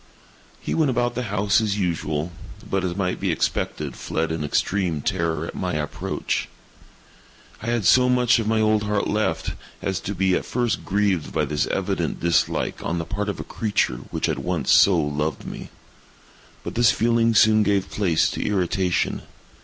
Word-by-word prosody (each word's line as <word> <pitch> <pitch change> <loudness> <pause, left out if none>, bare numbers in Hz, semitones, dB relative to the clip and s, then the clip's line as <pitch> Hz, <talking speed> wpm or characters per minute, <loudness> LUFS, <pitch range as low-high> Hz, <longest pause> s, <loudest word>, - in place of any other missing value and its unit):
He - - -3
went 155 -3 +2
about 120 -1 0
the 125 +1 -3
house 100 +1 +2
as 105 -2 -1
usual, 80 -3 -1 0.4
but, 95 -1 -1
as 90 -2 -2
might 95 -2 -1
be - - 0
expected, - - -2
fled 80 +1 -2
in 80 -2 -2
extreme 85 +1 0
terror 80 +1 -1
at - - -7
my 90 -1 -3
approach. 75 -1 -3 1.1
I 110 - -6
had 120 -4 0
so 125 +4 +5
much 125 -1 +4
of 110 - -2
my 110 0 +2
old 110 0 +3
heart 105 -1 0
left, 80 -7 -1 0.3
as 95 -3 -2
to 100 - -5
be 95 +1 +2
at - - +1
first 120 -3 -1
grieved 100 -4 0
by - - 0
this 75 -1 -1
evident - - -2
dislike 85 -2 0
on 85 - -1
the 80 - -3
part 105 +1 -3
of 100 - -4
a - - -4
creature 105 - -1
which - - -1
had - - -1
once 85 -7 -1
so 95 -3 +6
loved 75 +1 -2
me. - - -7 0.9
But - - -5
this 120 -1 +4
feeling 115 0 +2
soon 110 +1 +6
gave 100 -2 +1
place 90 -6 +2
to - - -3
irritation. 95 -2 0
100 Hz, 175 wpm, -23 LUFS, 85-110 Hz, 1.1 s, so